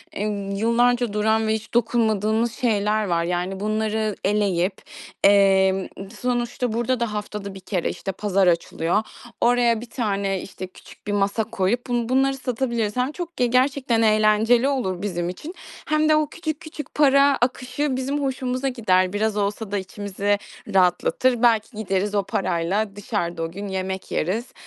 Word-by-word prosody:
eee, 205 - -2 0.3
yıllarca 235 +2 +2
duran 220 +1 +2
ve 220 - +2
hiç 220 +1 -5
dokunmadığımız 225 -1 +1
şeyler 215 -3 +1
var. 170 -3 0
Yani, 180 +2 -2
bunları 215 0 -1
eleyip, 195 -2 +1 0.5
emm, 195 -1 +4 0.3
sonuçta 245 -1 -1
burada 240 +2 0
da 235 -3 -1
haftada 210 -1 -5
1 195 - -9
kere, 185 -2 -2
işte, 195 - -4
pazar 195 -1 +1
açılıyor. 170 +3 +1 0.4
Oraya 240 -2 +3
bir 240 - -10
tane, 200 -5 -1
işte, 190 -1 -8
küçük 185 - -17
bir - - -1
masa 200 +2 +1
koyup 230 +2 -1
bun 240 -1 -1
bunları 270 +1 +2
satabiliriz. 235 -4 -2
Hem 255 +3 +1
çok 340 0 -7
ge 250 - +3
gerçekten 255 -1 +2
eğlenceli 215 +3 +4
olur 225 -11 -1
bizim 175 -4 -2
için 300 - -8 0.3
hem 310 0 +2
de 310 - +6
o 305 0 +2
küçük 315 -2 -4
küçük 310 -1 -9
para 280 -1 +5
akışı 255 +2 -1
bizim 275 +3 -2
hoşumuza 260 0 -1
gider. 185 -7 +1
Biraz 215 +1 +1
olsa 205 +1 -2
da 205 - 0
içimize 200 +1 -2 0.4
rahatlatır. 195 +7 +2
Belki 225 -2 +2
gideriz 205 0 -1
o 200 - +2
parayla 195 +3 -1
dışarıda 175 -5 -3
o 165 - -4
gün 200 +4 -6
yemek 190 0 -4
yeriz. 220 +9 -2
215 Hz, 155 wpm, -23 LUFS, 195-245 Hz, 0.5 s, de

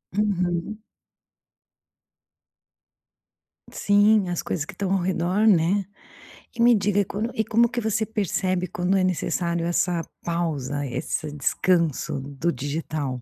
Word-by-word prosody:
Uhum. 190 0 -1 2.9
Sim, 205 -1 +3
as 175 - -1
coisas 155 - -2
que - - -8
estão 195 -2 -3
ao 190 - +1
redor, 185 +3 +1
né. 190 0 +4 0.7
E 235 - -2
me 240 0 +7
diga: 205 -1 +2
quando 215 +5 -3
e 220 - +1
como 235 +3 +3
que 240 0 -3
você 220 0 0
percebe 185 -4 -1
quando 180 +3 0
é 190 - +3
necessário 170 -1 -1
essa 175 0 +1 0.2
pausa, 145 -5 -2
esse 150 +3 -3
descanso 160 0 0
do 145 +4 -2
digital? 145 -1 -3
180 Hz, 125 wpm, -24 LUFS, 165-205 Hz, 2.9 s, me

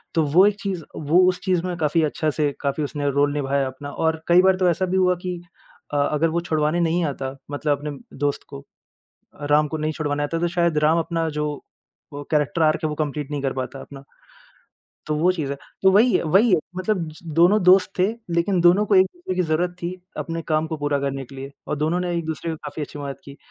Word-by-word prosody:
तो 165 - +3
वो 185 +4 +7
एक 210 - +1
चीज़ 190 -5 -3
वो 160 +4 +2
उस 180 - -2
चीज़ 185 -3 +1
में 180 -1 -2
काफ़ी 160 0 +1
अच्छा 155 +1 0
से 145 -1 +2
काफ़ी 140 +1 -1
उसने 145 0 -2
रोल 145 +1 +2
निभाया 140 -1 0
अपना 130 +2 -8
और 160 +1 -1
कई 175 +1 +6
बार 190 0 +5
तो 185 -1 +3
ऐसा 185 +3 -1
भी 185 +1 -1
हुआ 180 -1 +3
कि 180 -1 -3 0.6
अ, - - +1
अगर 150 +3 +1
वो 170 +2 -1
छुड़वाने 155 0 0
नहीं 170 +1 +1
आता 135 -2 -4 0.2
मतलब 145 0 0
अपने 150 +1 -5 0.3
दोस्त 145 0 -1
को। 140 0 -10 0.9
राम 150 0 +4
को 160 - -3
नहीं 155 +1 -1
छुड़वाने 145 -2 -2
आता 165 +3 -2
तो 175 - +1
शायद 170 -2 +1
राम 160 +2 +4
अपना 165 0 -1
जो 150 - 0 0.7
वो 145 0 -6
कैरेक्टर 150 +1 +1
आर्क 155 0 +3
है - - +2
वो - - -3
कंप्लीट 150 -1 -3
नहीं 145 -2 -3
कर 135 -1 0
पाता 130 +1 -5
अपना। 140 -1 -11 1.0
तो 155 - 0
वो 175 +5 +3
चीज़ 155 -6 -3
है। 140 - -4 0.2
तो 190 - +5
वही 225 +5 +5
है - - +1
वही 195 +8 +4
है। 175 - +5 0.2
मतलब 185 -3 -1
स - - -14 0.2
दोनों 185 +5 +5
दोस्त 185 +1 +5
थे, 185 - +4 0.3
लेकिन 175 +2 +1
दोनों 180 +5 +5
को 205 - +2
एक 185 0 +7
दूसरे 350 - -5
की 185 - +2
ज़रूरत 175 +2 0
थी 170 - -2 0.3
अपने 165 0 -3
काम 155 0 +1
को 160 -1 -4
पूरा 145 -1 0
करने 135 -1 -3
के 135 - -14
लिए। 135 +1 -7 0.2
और 150 - -1
दोनों 155 +4 0
ने 180 -1 -2
एक-दूसरे 160 0 -3
को 160 - -5
काफ़ी 150 +1 -6
अच्छी 145 - -9
मदद 140 -1 -6
की। 140 0 -11
160 Hz, 235 wpm, -22 LUFS, 145-175 Hz, 1.0 s, वो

